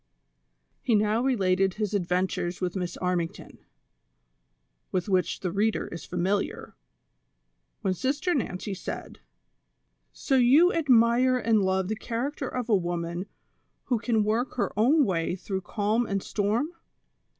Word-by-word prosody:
He 235 - +2
now 215 +2 +2
related 195 -7 +2
his 210 -1 -2
adventures 180 -1 -1
with 180 0 -2
Miss 180 -2 -3
Armington, 180 -2 -3 1.3
with 185 0 -1
which 185 -3 0
the 180 - -2
reader 210 +3 0
is 170 - -8
familiar, 185 +3 -2 1.1
when 195 -3 +1
Sister 285 - -1
ISTancy 205 - -2
said: - - -7 0.5
" - - -49
So 270 - +3
you 280 +9 +6
admire 255 -3 +4
and 225 -3 +2
love 190 0 +1
the 220 - -1
character 255 +6 -3
of 250 -2 -3
a 220 - +4
woman 175 0 -2 0.6
wlio 235 -3 +2
can 225 -3 +2
work 225 +5 -1
her 250 - 0
own 275 +7 +4
way 175 -3 -1
through 190 +1 -4
calm 215 +5 0
and 195 -1 -2
storm 215 +8 0
205 Hz, 135 wpm, -27 LUFS, 185-240 Hz, 1.3 s, you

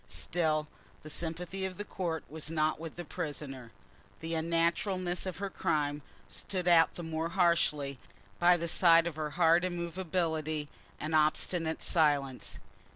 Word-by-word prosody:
Still 155 -3 0 0.4
the 155 - -7
sympathy 175 +4 -3
of 190 -1 -3
the 205 - -4
court 170 -6 -3
was 155 0 -4
not 155 -1 +1
with 165 -1 -7
the 175 - -6
prisoner. 135 -6 -5 0.5
The 165 +1 -3
unnaturalness 170 +3 0
of 185 - -4
her 200 0 -4
crime 145 -3 0 0.3
stood 180 -2 -4
out 165 -2 +5
the 175 - -6
more 160 0 -2
harshly 165 -6 +2 0.4
by 175 0 +6
the 170 0 -3
side 165 0 +5
of 170 -3 -3
her 155 -1 -2
hard 170 0 +5
immovability 170 -4 -2 0.3
and 155 +1 -3
obstinate 160 +2 +2
silence. 145 -5 +1
165 Hz, 145 wpm, -31 LUFS, 155-175 Hz, 0.5 s, by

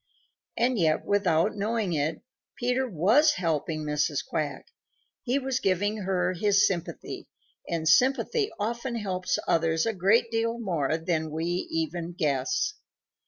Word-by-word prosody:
And 240 0 +2
yet 160 -2 +2
without 200 -2 +2
knowing 210 -2 -1
it, 155 +1 -1 0.3
Peter 250 +1 0
WAS 225 - +4
helping 160 - -1
Mrs. 150 -1 -1
Quack. 150 -2 -3 0.6
He 250 +2 0
was 265 -2 -1
giving 205 +3 0
her 185 -2 0
his 200 +2 +3
sympathy, 180 -5 -4 0.4
and 165 -2 -1
sympathy 275 - +3
often 235 +4 -2
helps 185 -4 -1
others 165 -1 +2
a 225 - 0
great 215 +5 +2
deal 230 +1 0
more 165 - -1
than 160 -1 -1
we 160 +2 -3 0.2
even 165 +2 -3
guess. 150 - 0
185 Hz, 130 wpm, -27 LUFS, 160-230 Hz, 0.6 s, WAS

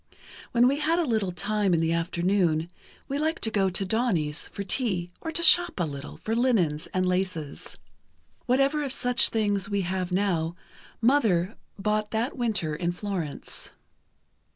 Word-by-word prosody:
When 240 +1 +4
we 280 +3 +1
had 320 +3 +1
a 350 - +2
little 220 -7 0
time 205 0 +1
in - - +1
the 165 0 +1
afternoon, 170 -1 0 0.4
we 280 +1 -2
liked 315 +2 -1
to 220 - +1
go 195 -3 +2
to 195 +2 -1
Doni's, 185 -9 0
for 200 - -6
tea, 185 -4 -1
or 325 - -4
to 340 +1 0
shop 350 - +6
a 175 - +1
little, 140 -1 -7
for 225 - -3
linens 195 -12 +1
and 185 0 -1
laces. 180 -5 -3 0.7
Whatever 275 +4 +2
of 275 - -3
such 250 -2 +4
things 205 -3 0
we 200 -1 0
have 185 0 -3
now, 175 -4 0 0.5
Mother 220 -7 +2 0.2
bought 210 +1 -1
that 225 +4 -2
winter 215 - 0
in 170 +2 -1
Florence. 180 -6 -5
200 Hz, 160 wpm, -26 LUFS, 175-240 Hz, 0.7 s, shop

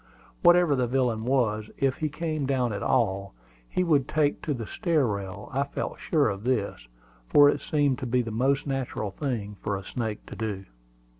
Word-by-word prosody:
Whatever 175 -3 +6
the 125 -2 +1
villain 120 -3 0
was, 110 -5 +1
if 135 -1 +1
he 155 - -1
came 155 -2 -2
down 125 -4 +1
at 100 - -4
all, 100 - 0 0.3
he 185 - +1
would 150 -6 +2
take 150 -2 +1
to 155 - -3
the 115 -3 -5
stair 160 - +1
rail. 100 -2 -4
I 135 - +1
felt 140 - -5
sure 155 -4 +2
of 100 -1 -3
this, 115 - -1 0.4
for 145 - +7
it 145 - 0
seemed 145 -3 +1
to 130 - -4
be 125 +1 +2
the 115 - -5
most 135 +5 +1
natural 130 -7 -3
thing 105 -4 -4
for 100 -2 -1
a 95 - -8
snake 110 0 -4
to - - -9
do. 105 -3 -4
125 Hz, 195 wpm, -27 LUFS, 105-145 Hz, 0.4 s, for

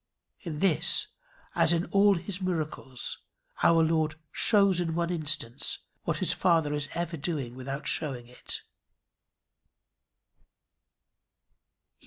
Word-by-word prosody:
In 165 -5 -6
this, 165 -1 +2 0.4
as - - +4
in 170 +1 0
all 200 0 +5
his 180 +2 -5
miracles, 155 -8 -3 0.4
our 165 -1 +5
Lord 160 -1 +1 0.2
shows 200 -4 +4
in 165 -2 -2
one 170 0 0
instance 155 -8 0 0.3
what - - 0
his - - +2
Father 165 -4 +2
is 145 -1 -3
ever 170 -1 -3
doing 140 -5 -3
without 135 +3 -6
showing 135 -6 0
it. 125 +1 -8
160 Hz, 110 wpm, -28 LUFS, 145-175 Hz, 0.4 s, all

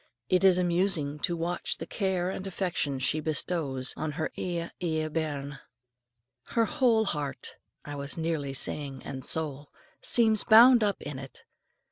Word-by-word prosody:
It 185 0 +3
is 190 -2 +6
amusing 175 -5 0
to 170 +3 -1
watch 170 +2 -2
the - - -6
care 190 -3 -1
and 190 0 -6
affection 175 -7 -2
she 130 +4 +1
bestows 150 -4 -1
on 155 -1 -3
her 160 +1 -3
"ae, 170 -2 -3
ae 160 -3 -1
bairn." 145 -3 -3 0.8
Her 230 - 0
whole 240 -6 +2
heart 145 -7 -3 0.3
I 145 - -6
was 140 +1 -4
nearly 160 -4 -2
saying 135 -1 -2
"and 130 -1 -6
soul" 145 -2 -1 0.3
seems 220 -3 +3
bound 235 +2 +8
up 200 -2 0
in 145 -2 -6
it. 135 -2 -11
160 Hz, 150 wpm, -28 LUFS, 145-190 Hz, 0.8 s, bound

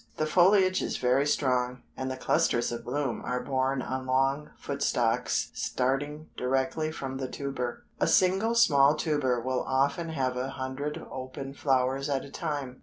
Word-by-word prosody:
The 155 - +1
foliage 185 +3 +4
is - - -2
very 130 +3 +2
strong, 125 -3 0
and 130 0 -3
the 130 - -4
clusters 120 -2 +1
of 120 0 -5
bloom 140 -3 -2
are 125 0 -1
borne 130 0 0
on 130 0 -4
long 135 +3 +1
foot - - -5
stalks - - +1
starting 145 +4 -1
directly 135 +5 0
from 135 -4 -5
the 135 -1 -3
tuber. 130 -3 -4
A - - +2
single 195 +5 +3
small 145 -10 +5
tuber 145 -6 0
will 130 +1 -1
often 140 +5 0
have 130 -5 -1
a 130 +1 -2
hundred 135 +3 -4
open 130 +1 -6
flowers 135 0 +1
at 140 -1 -1
a 140 - -12
time. 145 -6 -4
135 Hz, 165 wpm, -28 LUFS, 130-150 Hz, -, small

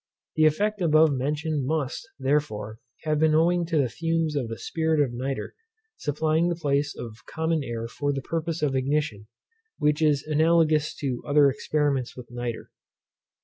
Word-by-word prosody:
The 155 0 +5
effect 205 +7 0
above 155 -2 +5
mentioned 150 +2 -1
must, 150 -3 -2
therefore, 130 -7 -1 0.2
have 155 -1 0
been 155 0 +4
owing 170 +1 +3
to 165 -2 0
the 140 -3 +3
fumes 165 +3 -1
of 135 -5 -1
the 115 0 -5
spirit 160 +3 0
of 135 -5 +2
nitre 130 +3 -4 0.4
supplying 155 +3 +1
the 175 - 0
place 145 -2 0
of 115 -1 -9
common 160 -1 -1
air 115 -2 -4
for 145 +4 -2
the 135 -1 -3
purpose 165 0 -3
of 140 -3 +1
ignition, 130 -6 -1 0.5
which 150 +1 +1
is 150 -3 +3
analogous 155 0 +2
to 130 -5 -3
other 145 -1 +5
experiments 140 -3 -1
with 120 -2 -10
nitre. 120 -1 -5
150 Hz, 160 wpm, -26 LUFS, 135-160 Hz, 0.5 s, The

